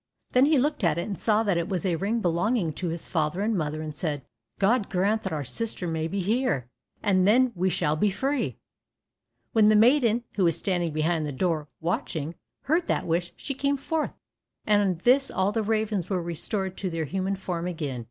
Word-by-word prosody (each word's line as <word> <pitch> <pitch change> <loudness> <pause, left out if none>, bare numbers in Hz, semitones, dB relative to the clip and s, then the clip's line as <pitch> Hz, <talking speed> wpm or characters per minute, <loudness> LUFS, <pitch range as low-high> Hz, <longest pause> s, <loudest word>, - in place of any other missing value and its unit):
Then 255 +2 +5
he 310 -1 +4
looked 295 -1 0
at 165 -2 +3
it, 170 - -1
and 205 - -4
saw 215 +3 +2
that 195 -5 +1
it 170 - -3
was 185 -1 -2
a 180 -3 +2
ring 210 +7 -1
belonging 175 0 +1
to 180 - -4
his 165 0 -3
father 160 +2 -1
and 220 +1 +1
mother, 155 -2 -2
and 155 -1 -5
said, 145 -3 -3 0.3
"God 210 +2 +2
grant 205 +3 +1
that 190 - -4
our 150 -2 -2
sister 215 - -1
may 160 -1 -1
be 195 +3 -2
here, 210 - 0 0.4
and 185 -2 +3
then 250 +4 +5
we 185 0 +1
shall 150 -4 +1
be 205 +7 +2
free." 245 - -1 1.0
When 220 -2 +5
the 215 - +6
maiden, 235 0 +4
who 190 - +3
was 165 -2 +2
standing 175 -4 0
behind 155 +1 0
the - - -3
door 155 +1 -1
watching, 165 -2 -2 0.3
heard 335 +4 +1
that - - 0
wish, 175 +1 -1
she 275 - -4
came 280 +1 0
forth, 310 +3 -2 0.5
and 210 -1 +4
on 190 -3 +1
this 270 +3 +4
all 190 +2 +1
the 225 - 0
ravens 215 -4 -1
were 190 -3 0
restored 185 +3 -3
to 190 - -2
their 165 -2 -2
human 190 +5 -1
form 180 -3 -4
again. 150 -8 -3
190 Hz, 210 wpm, -26 LUFS, 165-220 Hz, 1.0 s, the